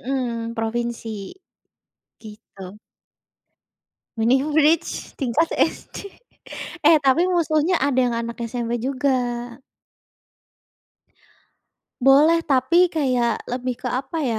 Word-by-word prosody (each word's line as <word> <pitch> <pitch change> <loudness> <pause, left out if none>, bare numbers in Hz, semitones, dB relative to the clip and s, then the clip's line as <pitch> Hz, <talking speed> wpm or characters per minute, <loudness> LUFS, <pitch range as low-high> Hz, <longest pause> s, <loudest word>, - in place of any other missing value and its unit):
Mhm, 235 -3 -3
provinsi, 230 +1 -3 1.2
gitu. 210 -2 -12 1.4
Mini 250 +4 +3
bridge 310 +2 +1
tingkat 275 +4 0
SD, 400 - -2 0.7
eh, 315 +1 +6
tapi 300 +6 +2
musuhnya 335 0 +1
ada 270 -3 0
yang 235 -2 0
anak 235 0 -5
SMP 240 -1 -3
juga. 250 -3 -1 2.5
Boleh, 300 +5 +6
tapi 300 +6 +3
kayak 250 -6 0
lebih 250 0 -3
ke 250 - -2
apa 265 +7 -4
ya, 230 -5 -1
255 Hz, 90 wpm, -22 LUFS, 235-300 Hz, 2.5 s, eh